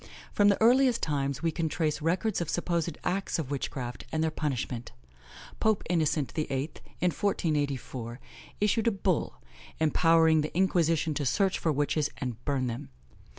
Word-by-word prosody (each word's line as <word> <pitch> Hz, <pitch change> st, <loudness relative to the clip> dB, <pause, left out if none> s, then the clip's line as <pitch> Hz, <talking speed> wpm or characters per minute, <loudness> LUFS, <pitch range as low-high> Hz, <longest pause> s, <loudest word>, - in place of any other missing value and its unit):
From 205 Hz, -, +4 dB
the 200 Hz, -, +4 dB
earliest 245 Hz, +1 st, +4 dB
times, 140 Hz, -1 st, -1 dB
we 165 Hz, -, +2 dB
can 160 Hz, 0 st, -1 dB
trace 155 Hz, -1 st, -1 dB
records 180 Hz, +5 st, 0 dB
of 170 Hz, -, -3 dB
supposed 170 Hz, -1 st, -1 dB
acts 190 Hz, +2 st, -1 dB
of 150 Hz, -4 st, -4 dB
witchcraft, 130 Hz, -3 st, -4 dB
and 160 Hz, 0 st, 0 dB
their 160 Hz, -, +1 dB
punishment. 130 Hz, -5 st, -3 dB, 0.7 s
Pope 220 Hz, -2 st, +2 dB
Innocent 155 Hz, -4 st, +1 dB
VIII., 155 Hz, -, -2 dB, 0.5 s
in 180 Hz, 0 st, +2 dB
1484, 140 Hz, -, -2 dB, 0.4 s
issued 210 Hz, +2 st, +2 dB
a -, -, +5 dB
bull, 190 Hz, -4 st, -1 dB, 0.4 s
empowering 160 Hz, 0 st, +4 dB
the 155 Hz, +3 st, -4 dB
Inquisition 165 Hz, -4 st, +2 dB
to 145 Hz, -, -2 dB
search 190 Hz, +8 st, +1 dB
for 160 Hz, -, +1 dB
witches 145 Hz, +1 st, 0 dB
and 125 Hz, -3 st, -5 dB
burn 140 Hz, -3 st, 0 dB
them. 115 Hz, -, -4 dB
160 Hz, 150 wpm, -29 LUFS, 145-180 Hz, 0.7 s, a